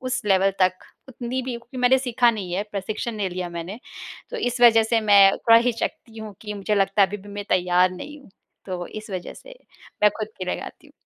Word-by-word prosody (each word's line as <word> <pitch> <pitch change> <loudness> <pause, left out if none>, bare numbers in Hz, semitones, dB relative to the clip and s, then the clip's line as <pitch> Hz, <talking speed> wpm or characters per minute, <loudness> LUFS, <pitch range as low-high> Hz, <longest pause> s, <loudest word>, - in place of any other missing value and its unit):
उस 255 0 -3
लेवल 195 -1 +3
तक 185 0 +3 0.3
उतनी 255 0 -4
भी 255 - -5
क्योंकि 235 +2 -13
मैंने 250 +1 +4
सीखा 245 -2 +2
नहीं 200 -6 -6
है, 190 +3 0
प्रशिक्षण 210 +4 -4
नहीं 200 -3 -2
लिया 180 0 -4
मैंने। 170 +5 -7 0.5
तो - - -5
इस 245 - -2
वजह 225 -2 +7
से 225 - +4
मैं 195 -1 +8
थोड़ा 230 0 +5
हिचकती 230 -1 -3
हूँ 215 -2 -8
कि 210 -1 -6
मुझे 205 +1 -1
लगता 195 0 +2
है, 195 - +4
अभी 205 - -5
भी 205 0 -14
मैं 205 0 -6
तैयार 180 0 +3
नहीं 290 +12 -9
हूँ। 270 - -19 0.4
तो 180 -2 -5
इस 215 0 -9
वजह 185 -2 -5
से - - -14 0.4
मैं 210 - +7
खुद 215 -1 -3
के 185 - -4
लिए 180 - -2
गाती - - -11
हूँ। - - -20
210 Hz, 230 wpm, -23 LUFS, 190-240 Hz, 0.5 s, मैं